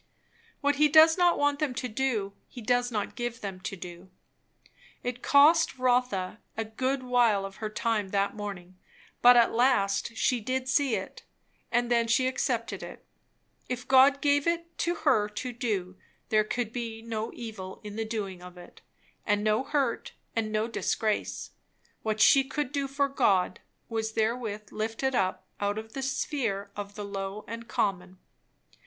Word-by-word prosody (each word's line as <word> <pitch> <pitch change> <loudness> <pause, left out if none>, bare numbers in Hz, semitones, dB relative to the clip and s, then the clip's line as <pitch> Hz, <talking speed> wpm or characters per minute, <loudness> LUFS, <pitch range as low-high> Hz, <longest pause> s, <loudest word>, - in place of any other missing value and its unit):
What 285 -1 +2
he 300 +1 +5
does 315 +2 +7
not 355 -1 +3
want 290 0 +1
them 285 -5 -1
to 250 - -2
do, 220 -4 -1
he - - -11
does 245 +2 +1
not 210 -3 -2
give 240 -2 -4
them 195 -2 -5
to 195 +1 -5
do. 180 0 -10 0.9
It 245 0 -4
cost 305 +2 +5
Rotha 245 -7 +1 0.2
a 225 - -1
good 255 +4 -2
while 240 -5 +3
of 195 0 -9
her 215 - -4
time 215 -2 -1
that 200 +1 0
morning, 185 -3 -7 0.4
but 245 0 +8
at 235 - +5
last 230 -3 +2
she 250 +1 +2
did 255 +3 -2
see 270 -3 +2
it, 190 -1 -6 0.5
and 240 0 +1
then 235 -1 +3
she 230 +3 +3
accepted 250 -2 -1
it. - - -10 0.6
If 250 0 -4
God 270 +1 +6
gave 285 +1 +3
it 335 0 -1
to 345 +1 0
her 215 -7 +3
to 245 +4 -5
do, 200 -7 -3 0.3
there 215 -1 +3
could 235 0 -3
be 230 -2 -5
no 225 -1 -4
evil 210 -5 -7
in 210 -1 -7
the 225 - -1
doing 205 -5 -4
of 180 0 -11
it, 175 0 -14 0.4
and 205 -1 +1
no 215 +3 +2
hurt, 275 -4 -1 0.2
and 220 -1 -1
no 215 +1 0
disgrace. 220 -2 -2 0.5
What 220 -1 -2
she 270 +6 +7
could 290 -1 -3
do 280 -1 -1
for 280 +1 +1
God, 190 -10 +2 0.3
was 220 -1 -3
therewith 220 -2 -2
lifted 225 +5 -2
up 185 -6 0
out 205 +1 -1
of 220 0 -7
the 270 - -4
sphere 260 -6 -2
of 205 0 -6
the 210 - -5
low 195 +1 -5
and 230 +1 -7
common. 185 -4 -1
230 Hz, 170 wpm, -28 LUFS, 205-260 Hz, 0.9 s, but